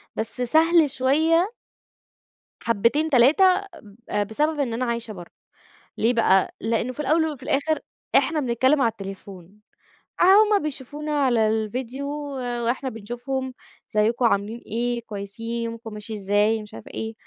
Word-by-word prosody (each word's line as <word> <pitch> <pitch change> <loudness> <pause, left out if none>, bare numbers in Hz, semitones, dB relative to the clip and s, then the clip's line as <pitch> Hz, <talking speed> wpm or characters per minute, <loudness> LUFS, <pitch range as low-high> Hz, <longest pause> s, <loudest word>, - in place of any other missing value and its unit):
بس 225 +3 -3
سهل 320 +4 +4
شوية 320 - +2 1.1
حبتين، 235 +8 +1
تلاتة 270 +7 +5 0.4
ب 205 -1 -16
آآ، 210 - +1
بسبب 295 +9 -1
إن 255 -5 -1
أنا 250 +2 -1
عايشة 235 -2 -3
برّه. 175 -4 -11 0.7
ليه 230 +3 +2
بقى؟ 195 -5 +3
لأن 230 +2 -1
في 255 - -14
الأول 310 +3 +2
وفي 270 -3 -10
الآخر 290 +4 0 0.4
إحنا 320 -2 +3
بنتكلم 260 +2 +2
على 230 - +4
التليفون، 195 -2 -10 0.6
آآ - - +4
هم 415 +2 +6
بيشوفونا 300 +1 -5
على 235 -4 +3
الفيديو 235 +5 -3 0.6
وإحنا 260 +3 -1
بنشوفهم، 245 +4 -5 0.4
أزيكم؟ 225 +4 +2
عاملين 215 +1 0
إيه؟ 240 +2 -2
كويسين؟ 225 +2 -5
يومكم 230 -1 -6
ماشي 210 +1 -7
إزاي؟ 205 +2 +1
مش 210 - -13
عارفة 115 - -10
إيه، 220 0 -4
235 Hz, 140 wpm, -24 LUFS, 220-280 Hz, 1.1 s, هم